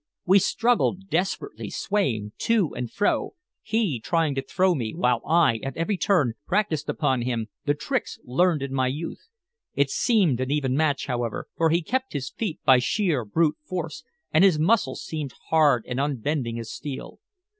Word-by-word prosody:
We 190 +2 +6
struggled 195 -2 +1
desperately, 190 - -2
swaying 120 - -1
to 220 -8 +1
and 125 -2 -4
fro, 205 - 0 0.3
he 210 - 0
trying 160 +4 +1
to 135 - -1
throw 185 +6 +2
me, 115 -8 -3
while 125 -1 +1
I, 160 -7 +4
at 135 -1 -5
every 170 +5 0
turn, 165 - +2
practiced 175 -7 0
upon 135 -5 +1
him 120 -2 -2 0.2
the 145 - +2
tricks 255 - -3
learned 155 +3 +1
in 135 -1 -4
my 130 -1 +1
youth. 150 +6 -5 0.5
It 140 -1 +2
seemed 195 - +2
an 130 - -2
even 135 -3 0
match, 145 -2 +1
however, 120 -4 -3
for 165 -1 +2
he 170 +2 +2
kept 260 +8 -2
his 135 -3 -3
feet 205 -9 -4
by 130 -1 +7
sheer 155 - 0
brute 155 +8 +1
force, 165 -2 -5 0.3
and 160 - +5
his 190 -5 +5
muscles 200 +9 +1
seemed 150 -5 -5
hard 145 -7 +4
and 125 +1 -3
unbending 140 -3 -1
as 115 -1 -6
steel. 140 -3 -7
150 Hz, 170 wpm, -25 LUFS, 130-185 Hz, 0.5 s, by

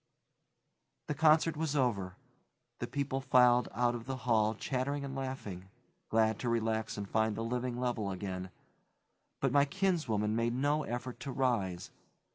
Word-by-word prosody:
The - - +1
concert 155 +2 +4
was 155 -1 -1
over; 100 -9 0 0.6
the - - -3
people 140 -1 -2
filed 125 -2 +5
out 120 +3 +1
of 120 0 -6
the 135 -1 -3
hall 110 -2 +3
chattering 140 +4 -2
and 135 0 -6
laughing, 105 -9 -5 0.4
glad 110 -1 +2
to 120 - -1
relax 110 -2 0
and 100 -1 -4
find 110 +1 +1
the 115 - -3
living 125 +1 -2
level 120 -5 -1
again, 95 -1 -4 0.9
but 135 - +2
my 140 +1 +5
kinswoman 145 - 0
made 115 +1 0
no 145 +4 +1
effort 120 -1 -5
to 140 - -5
rise. 110 -10 -1
120 Hz, 150 wpm, -32 LUFS, 110-135 Hz, 0.9 s, filed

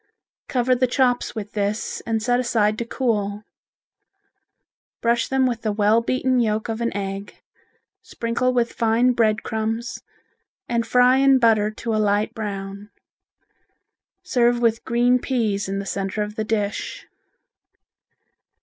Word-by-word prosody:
Cover 255 0 +1
the 255 +1 +2
chops 250 -1 +1
with 210 -2 -6
this 205 +1 -2
and 225 -1 -1
set 245 +2 +2
aside 220 -4 +1
to 235 - -2
cool. 210 -5 -1 1.6
Brush 235 0 +1
them 265 -1 +2
with 240 -2 -1
the 215 - -1
well 210 +2 +3
beaten 255 +1 +1
yolk 215 -1 0
of 225 +1 -3
an 235 - 0
egg, 195 0 -6 0.6
sprinkle 235 +2 -1
with 240 -2 0
fine 230 +2 +2
bread 225 -2 +1
crumbs, 225 +1 -3 0.7
and 235 -1 -1
fry 250 +1 +5
in 270 0 +5
butter 220 -4 +3
to 225 +1 -4
a 215 - +1
light 205 0 +1
brown. 200 -1 -6 1.3
Serve 240 -1 +2
with 230 -1 +1
green 245 +1 +3
peas 215 -7 -1
in 195 - -2
the 200 - -4
center 195 +2 -2
of 210 0 -6
the 220 - -2
dish. 210 -2 -3
225 Hz, 140 wpm, -22 LUFS, 210-245 Hz, 1.6 s, fry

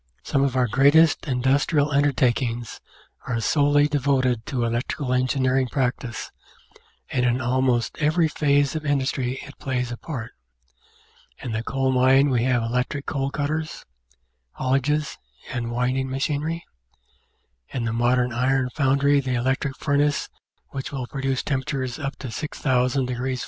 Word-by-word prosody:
Some 135 - 0
of 135 -2 +1
our 130 -1 +3
greatest 145 +8 +4
industrial 140 +3 +2
undertakings 125 -4 +1 0.5
are 115 -2 -1
solely 145 +4 +3
de 145 -1 0
voted 130 -4 +1
to 125 -3 -1
Electrical 125 +3 -2
Engineering 130 0 +1
practice, 125 -3 -2 0.8
and 125 - +1
in 125 0 +2
almost 125 -1 0
every 160 +2 +3
phase 145 -1 +1
of 155 - -3
industry 135 -3 0
it 145 - -13
plays 125 -4 -2
a 120 - -5
part: 125 -7 -6 1.1
in 120 - -4
the 110 0 -1
coal 135 +2 0
mine 130 +2 +4
we 120 -1 +2
have 125 -2 +2
electric 125 +4 -2
coal 135 -1 -1
cutters, 155 +2 -3 0.7
haulages, 140 +3 0 0.3
and 120 -2 -3
winding 125 +2 -1
machinery; 150 +5 -2 1.0
in 125 -3 -3
the 115 - -1
modern 120 +1 +2
iron 130 +1 +1
foundry 140 0 +3
the 130 -2 -1
electric 130 +2 -1
furnace 145 0 +1 0.4
which 135 -1 -5
will 135 -3 -4
produce 135 0 -2
tempera 135 -1 -2
tures 130 +4 -6
up 135 0 -3
to 130 - -7
6,000 130 -2 0
F. 130 +1 -2
130 Hz, 140 wpm, -24 LUFS, 125-140 Hz, 1.1 s, greatest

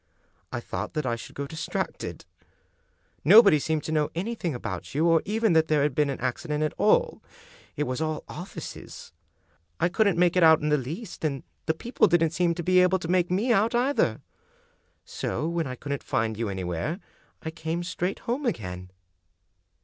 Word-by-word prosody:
I - - -2
thought - - -5
that 155 -2 -1
I 120 -2 0
should 115 - -10
go 140 - -3
distracted. 160 +3 -4 1.0
Nobody 200 - +8
seemed 155 +1 -1
to - - -4
know 150 -2 +1
anything 180 - -2
about 95 -1 -6
you, 155 +3 +2
or 165 -1 +4
even 220 -1 +1
that 160 0 +4
there 150 -2 +2
had 145 -2 +1
been 150 +1 +2
an 135 - -3
accident 150 +5 -2
at 155 - -1
all 475 - +3 0.3
— - - -25
^it 150 - +1
was 130 +1 -3
all 155 -1 -2
offices. 180 +3 -9 0.7
I 175 - +2
couldn't 200 -2 +2
make 175 0 +3
it 180 - +4
out 160 -1 +7
in 150 - -1
the 150 - +4
least, 160 - -6
and 140 -4 -1 0.2
the 160 - +2
people 235 +9 +2
didn't 165 -2 +3
seem 170 0 +1
to 170 - -4
be 185 +2 +4
able 180 +1 +4
to 175 - -6
make 180 0 +2
me 210 +7 +2
out 225 +3 +2
either. 260 +4 +1 0.8
So 155 - -3
when 170 -2 -1
I 130 - -5
couldn't 140 +2 -4
find 110 0 -1
you 115 0 -2
anywhere 95 - -3 0.4
I 160 - -4
came 160 +2 -3
straight 180 +1 -3
home 255 +3 -1
again." 90 - -4
160 Hz, 190 wpm, -26 LUFS, 145-185 Hz, 1.0 s, Nobody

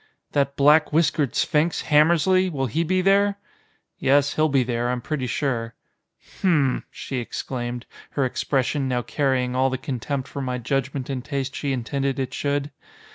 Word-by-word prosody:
"That 140 -1 +1
black 150 +2 +5
whiskered 155 -3 +1
sphinx, 160 +1 +1
Hammersly, 170 +5 +4
will 135 -5 -2
he 145 +8 0
be 185 +2 +1
there?" 200 +1 +3 0.6
"Yes, 140 +1 +3
he'll 155 0 +2
be 135 -2 +3
there, 120 0 -1
I'm 125 0 -1
pretty 130 +1 -3
sure." 115 -3 -2 0.7
"Hm 150 -9 +3
m!" - - -10
she 135 - -6
exclaimed, 120 0 -4 0.3
her 140 - +3
expression 135 +2 0
now 125 -1 -1
carrying 130 -3 0
all 130 +1 +3
the 130 - -2
contempt 135 0 -4
for 140 - -6
my 125 -1 -2
judgment 135 +1 -2
and 130 -3 -4
taste 135 -1 -3
she 140 - -2
intended 135 +2 -1
it 130 -1 -3
should. 145 +1 -1
140 Hz, 165 wpm, -23 LUFS, 125-150 Hz, 0.7 s, black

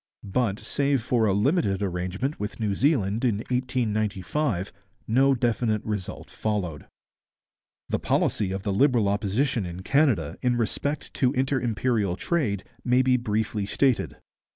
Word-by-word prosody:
But, 105 0 0
save 140 -2 0
for 120 -2 +2
a - - +3
limited 105 - +1
arrangement 95 - -2
with 105 +2 -5
New 105 -3 0
Zealand 115 -4 +1
in 115 -5 +2
1895, 110 - -1 0.3
no 135 +4 +4
definite 115 -3 0
result 105 -4 -5
followed. 95 -9 -3 1.0
The - - -1
policy 100 -3 +1
of 95 0 -4
the 100 - -1
Liberal 120 -1 +3
Opposition 105 +4 0
in 90 +1 -6
Canada 125 - +2
in 125 -1 +2
respect 140 +5 -2
to 130 0 +2
inter 135 0 +1
imperial 110 -4 0
trade 105 - -1 0.2
may 125 +1 +3
be 130 0 +3
briefly 110 -3 -1
stated. 130 +2 +1
110 Hz, 135 wpm, -26 LUFS, 100-130 Hz, 1.0 s, no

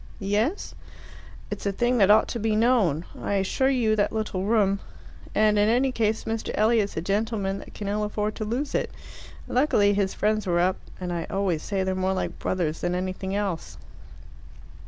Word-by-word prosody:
"Yes?" 210 - -1 0.8
"It's - - -3
a - - +2
thing 240 +4 +1
that 195 -1 +5
ought 215 +1 +6
to 235 - -3
be 220 0 +1
known. 215 - +2 0.2
I - - -2
assure 200 +7 +1
you, 235 -5 +2
that 205 -1 +1
little 215 -4 -2
room!... 200 -3 +2 0.6
And 215 -1 +4
in 205 +1 +4
any 255 +3 +3
case, 220 -2 0
Mr. 225 0 -3
Elliot's 215 -3 +2
a - - 0
gentleman 200 +1 -1
that - - -12
can 205 - -5
ill 210 +1 0
afford 210 0 -2
to - - -3
lose 245 +7 -2
it. - - 0 0.6
Luckily 220 -6 +3
his 200 -1 0
friends 215 -1 0
were 175 -1 +2
up; 185 +1 +2 0.2
and 180 -1 -3
I 170 -1 -2
always 190 -5 0
say 195 -2 -1
they're 190 0 0
more 185 0 0
like 190 - -3
brothers 165 -4 -1
than 175 0 0
anything 185 +1 -3
else." 200 -5 -3
205 Hz, 185 wpm, -25 LUFS, 190-220 Hz, 0.8 s, ought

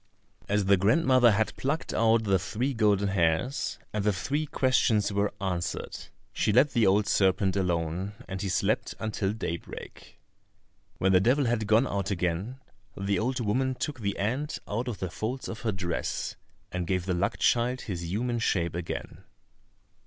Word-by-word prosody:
As 105 -1 +2
the 100 0 +5
grandmother 125 - +4
had 110 0 +1
plucked 145 +5 -2
out 115 0 +3
the 95 -3 +2
three 120 +8 -2
golden 105 -3 +2
hairs, 95 - 0 0.2
and 105 -1 -1
the 105 - +3
three 145 +10 -2
questions 115 -7 +2
were 100 +1 +1
answered, 90 -3 -3 0.4
she - - +1
let 130 +6 +5
the 115 -3 +3
old 100 +2 +4
serpent 95 -1 +2
alone, 90 +1 -1
and 95 0 -5
he 100 - -2
slept 90 - 0
until 105 -2 -1
daybreak. 85 -6 -7 0.8
When 95 - +2
the 90 - +6
devil 130 +7 +3
had 115 -3 0
gone 110 +4 +4
out 100 -5 -2
again 95 +6 -2 0.4
the 100 0 0
old 125 +3 -1
woman 130 +4 0
took 145 0 -4
the 100 -2 -2
ant 130 +9 -1
out 115 +5 -2
of 120 -5 -3
the 95 -2 -4
folds 125 +8 -4
of 115 - -6
her 110 - 0
dress, 90 -3 -3 0.4
and 90 -1 -3
gave 90 -1 0
the 95 - 0
luck 95 +4 0
child 125 +2 +2
his 90 -5 -5
human 120 +4 -1
shape 85 -6 0
again. 85 0 -5
105 Hz, 165 wpm, -28 LUFS, 95-120 Hz, 0.8 s, the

